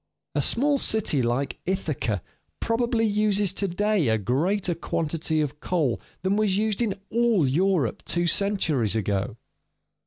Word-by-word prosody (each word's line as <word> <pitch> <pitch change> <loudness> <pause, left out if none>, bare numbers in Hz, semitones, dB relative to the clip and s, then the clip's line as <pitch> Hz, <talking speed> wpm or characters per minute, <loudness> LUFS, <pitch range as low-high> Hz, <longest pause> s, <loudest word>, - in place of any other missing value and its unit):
A - - +1
small 280 +3 +2
city 210 - +1
like 120 +3 -1
Ithaca 150 - -1 0.4
probably 230 0 +1
uses 205 -2 +1
to 200 - 0
day 205 - +1
a 110 0 +3
greater 170 - 0
quantity 160 -1 -2
of 150 0 -3
coal 150 -10 0 0.2
than 190 +2 +1
was 210 -3 +2
used 215 +1 0
in 215 -5 0 0.2
all 230 - +3
Europe 160 - +1
two 175 0 0
centuries 165 - +1
ago. 105 0 -1
180 Hz, 135 wpm, -25 LUFS, 140-210 Hz, 0.4 s, a